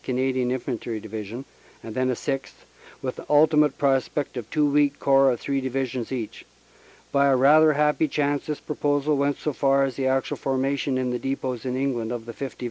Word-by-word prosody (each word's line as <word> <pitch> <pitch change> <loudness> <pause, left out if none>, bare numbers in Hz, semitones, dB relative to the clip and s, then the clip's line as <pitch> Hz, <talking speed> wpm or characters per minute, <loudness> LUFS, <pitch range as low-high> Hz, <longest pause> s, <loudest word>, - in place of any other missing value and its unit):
Canadian 130 0 0
Infantry 120 -3 -3
Divi 110 0 -6
sion, 120 +7 -8 0.4
and 110 - -7
then 130 +1 0
a 125 - 0
sixth, 135 +2 -5 0.4
with - - -3
the - - -9
ultimate 150 -1 +4
prospect 135 +1 0
of 120 -3 -6
two 150 +3 +2
weak 145 0 +2
Corps 135 0 +4
of 120 - -6
three 140 -1 -2
Divisions 130 -2 -3
each. 120 -5 -5 0.7
By 140 0 +3
a 135 - +4
rather 150 +4 +6
happy 150 +1 +2
chance 145 0 -1
this 150 -1 -3
proposal 145 0 0
went 140 0 0
so 150 - -3
far 135 0 +2
as 135 - -5
the 135 -1 0
actual 130 0 0
formation 135 0 -1
in 130 -1 -1
the 125 - -2
depots 130 -3 -3
in 125 -1 -2
England 125 -4 -1
of 120 -2 -5
the 115 - -7
5th. 135 +3 -6
135 Hz, 200 wpm, -24 LUFS, 125-145 Hz, 0.7 s, rather